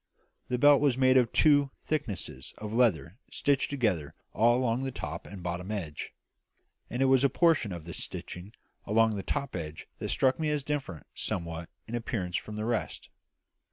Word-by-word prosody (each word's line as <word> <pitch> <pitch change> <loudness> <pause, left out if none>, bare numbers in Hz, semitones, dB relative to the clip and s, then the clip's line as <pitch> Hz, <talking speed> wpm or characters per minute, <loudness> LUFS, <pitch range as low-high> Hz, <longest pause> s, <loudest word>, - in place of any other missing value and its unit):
The 125 - 0
belt 145 +2 +6
was 140 -4 +3
made 130 0 +5
of 125 -3 +4
two 145 -2 +4
thicknesses 100 - -3
of 105 0 -6
leather 110 -5 +2
stitched 140 -2 +1
together 105 - 0 0.2
all 120 +2 +4
along 125 -1 +1
the 135 0 -2
top 80 - -6
and 95 -3 -9
bottom 90 +2 -4
edge; 85 -9 -4 0.8
and 125 +3 0
it - - +4
was 130 0 +4
a 140 - +5
portion 155 - +3
of 85 -3 -6
this 85 - -5
stitching 90 +5 -7 0.3
along 110 +1 +3
the 100 - -3
top 140 +6 -3
edge 80 -3 -6
that - - -3
struck 130 +1 +2
me 155 -1 0
as 150 -2 0
differing 140 - -3
somewhat 85 -2 -4 0.2
in 115 - -8
appearance 110 -7 -2
from 105 - -6
the 105 0 -3
rest. 120 -1 -2
115 Hz, 180 wpm, -29 LUFS, 90-135 Hz, 0.8 s, belt